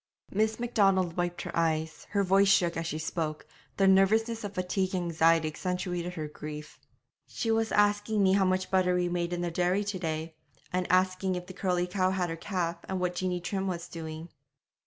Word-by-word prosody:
Miss 220 +2 +1
Macdonald 195 -7 +2
wiped 175 0 -2
her - - -5
eyes; 160 -1 -1
her 200 -1 +1
voice 195 +1 +4
shook 180 -3 +3
as 165 0 -2
she 155 - -3
spoke; 155 -1 -3 0.3
the 195 - +4
nervousness 220 +4 +3
of 205 -1 -6
fatigue 185 +1 -1
and 180 - 0
anxiety 165 -1 +3
accentuated 180 +2 -3
her 155 -3 -4
grief. 150 0 -8 0.5
'She 225 - -2
was 225 0 +1
asking 205 0 +2
me 190 0 +4
how 195 -1 +4
much 185 0 0
butter 185 -1 +3
we 180 -1 +1
made 175 0 -1
in 175 0 -2
the 175 -1 -2
dairy 180 +4 +1
to 200 -2 -3
day, 160 -1 -3 0.4
and 180 -1 0
asking 185 0 +2
if 180 0 -5
the 185 - -10
curly 180 -1 0
cow 185 0 +1
had 180 -2 -1
her - - -3
calf, 170 -1 -2
and 190 -1 -1
what 180 0 0
Jeanie 180 0 -1
Trim 195 +2 -2
was 170 -2 -3
doing.' 160 0 -7
180 Hz, 200 wpm, -29 LUFS, 170-195 Hz, 0.5 s, voice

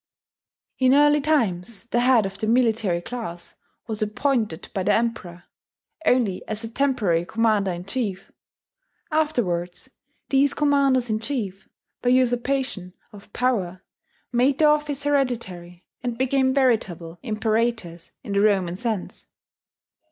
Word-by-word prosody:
In 260 0 +5
early 295 0 +5
times 230 - 0
the 240 0 0
head 245 -3 +4
of 195 0 -6
the 215 - -2
military 225 -7 +2
class 175 -6 -7 0.3
was 220 -2 -4
appointed 215 - -1
by 195 - -1
the 185 - +2
Emperor, 220 -7 -3 0.6
only 230 -7 +2
as 215 +1 -3
a 225 - -6
temporary 225 -11 +1
commander 215 0 +1
in 175 +1 -6
chief: 195 -3 -3 0.8
afterwards, 240 - -1 0.4
these 280 +1 +3
commanders 275 -5 +2
in 215 - 0
chief, 220 -6 -4 0.3
by 245 - +1
usurpation 245 -6 0 0.2
of 205 0 -14
power, 200 -9 -1 0.5
made 255 +3 +2
their 305 -1 +5
office 295 -2 0
hereditary, 225 -12 -2 0.2
and 245 -1 -3
became 260 +1 +2
veritable 195 - 0
imperatores, 220 -5 -2
in 200 - -5
the 200 - +2
Roman 190 -4 +2
sense. 220 -2 -4
230 Hz, 125 wpm, -23 LUFS, 190-260 Hz, 0.8 s, In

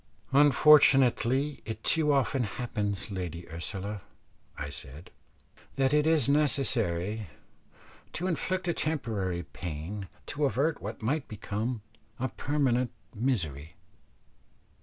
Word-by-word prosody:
"Unfortunately 140 -1 +5
it 110 0 -6
too 155 -2 +3
often 135 -1 +2
happens, 105 -1 -3
Lady 90 -3 -5
Ursula," 95 +5 -5 0.6
I 70 -1 -4
said, 70 +3 -10 0.6
"that 135 0 +2
it 150 +1 +4
is 160 -6 +4
necessary 115 - +1 0.9
to 175 - -3
inflict 185 +1 -1
a 170 - +2
temporary 110 - -2
pain 90 +6 -6 0.2
to 145 0 -1
avert 140 +4 +1
what 110 +2 -6
might 140 +6 0
become 110 +2 -3 0.4
a 130 +1 -1
permanent 130 -2 +1 0.2
misery." 80 - -2
120 Hz, 105 wpm, -29 LUFS, 95-145 Hz, 0.9 s, Unfortunately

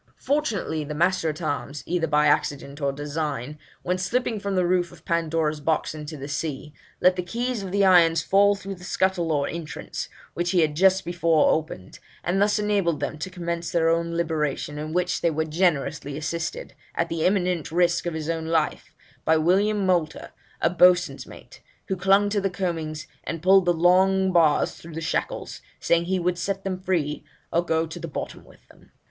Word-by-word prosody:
Fortunately 230 - -1
the 150 +1 -6
master 175 0 +1
at 155 +2 -5
arms, 145 -1 -3
either 170 -1 0
by 150 0 +3
accident 145 0 0
or 140 0 +1
design, 145 -1 -4 0.2
when 180 +1 -1
slipping 225 +3 -1
from 200 -1 -3
the 180 -1 +2
roof 175 -1 +1
of 175 -3 -17
"Pandora's 165 -2 0
Box" 155 +1 0
into 155 0 -7
the 140 0 -7
sea, 150 0 -4 0.3
let 180 0 +5
the 180 - -1
keys 235 +5 -3
of 190 -2 -6
the 200 0 +3
irons 165 -4 +5
fall 200 +1 +4
through 195 0 -7
the 180 -1 -12
scuttle 185 -3 0
or 145 -2 +1
entrance, 165 -2 -6 0.2
which 175 0 -1
he 175 -1 +3
had 150 -2 +1
just 190 +3 +3
before 170 -3 +3
opened, 155 -12 -3 0.2
and 185 +3 0
thus 205 +1 +3
enabled 200 -6 +1
them 155 - -4
to 185 - -4
commence 170 -2 -4
their 165 -1 +2
own 170 0 0
liberation, 150 -3 -2
in 155 +1 -5
which 180 +1 0
they 170 - +3
were 160 0 -1
generously 150 -4 0
assisted, 170 - -4 0.2
at - - 0
the 165 -1 -2
imminent 180 -5 +1
risk 175 0 +2
of 170 - -3
his 155 -1 -4
own 165 -1 -2
life, 160 -2 -1 0.3
by 160 - +3
William 195 +5 +2
Moulter, 175 -4 0 0.3
a 165 - +3
boatswain's 180 0 +3
mate, - - -14 0.3
who 190 - 0
clung 195 +2 +3
to 205 0 0
the 195 - 0
coamings, 165 -5 -3 0.2
and 165 -1 -5
pulled 190 0 +6
the 175 - +4
long 185 +3 +3
bars 165 -4 +3
through 165 -1 -12
the - - -3
shackles, 160 - -3 0.2
saying 170 0 +2
he 190 +2 0
would 180 0 -1
set 195 -1 -2
them 185 -1 -3
free, 165 -7 -1 0.3
or 170 - +2
go 160 -1 0
to 160 - -8
the 170 - -5
bottom 150 - -6
with - - -21
them. - - -21
170 Hz, 195 wpm, -24 LUFS, 155-185 Hz, 0.3 s, pulled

